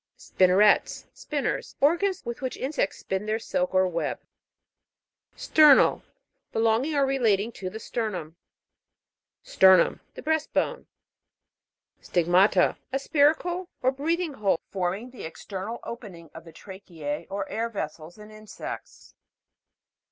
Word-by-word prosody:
SPIN'NERETS. 190 +3 +3
Spinners. 290 -3 -3
Organs 355 +6 +1
with 235 +2 -5
which 260 -1 -4
insects 265 -7 -2
spin 190 +2 -4
their 215 +1 0
silk 270 +4 -2
or 185 0 +4
web. 170 -2 -3 1.2
STER'NAL. 300 -3 +5 0.5
Belonging 225 +7 +1
or 280 -1 +3
relating 230 -5 +1
to 190 -4 -6
the 220 - -8
sternum. 195 -9 -4 1.1
STER'NUM. 190 -2 +5 0.2
The - - -9
breast 315 0 -1
bone. - - -1 1.1
STIG'MATA. 180 +2 +3
A 270 - 0
spiracle 315 +6 +1 0.2
or 260 - +4
breathing. 320 +4 -2
hole, 200 -8 0
forming 195 +6 -3
the 250 - -11
external 195 +7 -6
opening 185 - -9
of 165 +1 -11
the 165 - -12
tracheae 170 -7 -7
or 195 0 -4
air 230 +2 -3
vessels, 160 -4 -6
in 210 0 -13
insects. 215 - -9
215 Hz, 120 wpm, -26 LUFS, 185-275 Hz, 1.2 s, STER'NAL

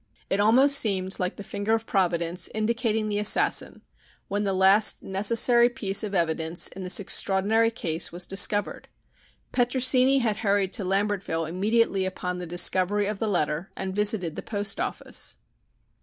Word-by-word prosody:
It 195 - 0
almost 265 +7 +4
seemed 190 -3 -1
like 180 -1 -3
the 200 - -9
finger 205 +3 -2
of 225 0 -5
Providence 175 -3 -1
indicating 220 0 -1
the 205 -1 -2
assassin 210 - +3 0.5
when 205 +1 -2
the 200 - -1
last 190 +3 +3
necessary 230 +5 +3
piece 200 -4 0
of 205 -2 -5
evidence 165 -1 0
in 190 - -11
this 185 +2 +2
extraordinary 200 +3 +1
case 170 -7 -3
was 175 +1 -2
discovered. 205 +1 0 0.6
Petrosini 255 +2 +2
had 225 -5 -1
hurried 200 -3 -1
to 210 - -1
Lambertville 195 -4 -2
immediately 200 +2 0
upon 180 -1 -5
the 180 - -7
discovery 185 +4 +2
of 205 0 -4
the 220 - -2
letter 170 -3 -2
and 190 0 -5
visited 205 -6 +1
the - - -6
post 205 -2 -3
office. - - -4
200 Hz, 155 wpm, -25 LUFS, 185-220 Hz, 0.6 s, almost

